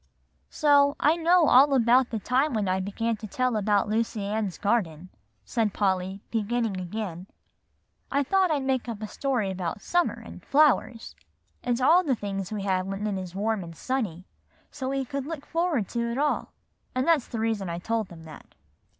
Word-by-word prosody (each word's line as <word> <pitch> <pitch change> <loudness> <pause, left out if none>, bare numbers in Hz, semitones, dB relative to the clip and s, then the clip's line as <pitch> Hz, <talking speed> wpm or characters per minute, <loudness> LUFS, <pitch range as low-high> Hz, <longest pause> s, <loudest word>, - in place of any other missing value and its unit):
"So, 285 -2 +4
I 305 +2 +4
know 340 0 +4
all 275 +2 +6
about 245 +1 +4
the 225 - -3
time 255 +5 +1
when 210 -3 0
I 185 +1 +1
began 220 +4 -2
to 215 - -8
tell 255 +3 0
about 205 -1 +2
Lucy 220 -1 -1
Ann's 205 -2 -2
Garden," 185 -6 -1 0.4
said 220 -5 -1
Polly, 190 -1 0
beginning 225 -2 -1
again. 185 -1 -5 0.8
"I 280 +1 +2
thought 380 +6 +2
I'd 295 -4 0
make 260 -2 -1
up 220 -2 -5
a - - -3
story 245 -6 -1
about 185 +1 -4
summer 350 0 +1
and - - -11
flowers, 275 -5 +2 0.5
and 245 -1 -1
all 330 +8 +5
the 275 -6 +1
things 195 -3 -5
we 210 -2 -3
have 190 -1 0
when 195 +2 -4
it 195 -3 -2
is 180 -1 -9
warm 210 0 -1
and 165 -1 -10
sunny, 200 -7 -3 0.5
so 265 -3 -4
we 270 0 -1
could 275 +2 -4
look 315 -3 -6
forward 330 - 0
to 235 -1 -2
it 235 - -3
all; 295 +1 0 0.4
and 255 +3 0
that's 320 -7 +3
the 230 - -5
reason 220 -4 -1
I 170 - -3
told 220 +3 -2
them 165 -2 -12
that." 155 -1 -13
225 Hz, 185 wpm, -26 LUFS, 195-270 Hz, 0.8 s, all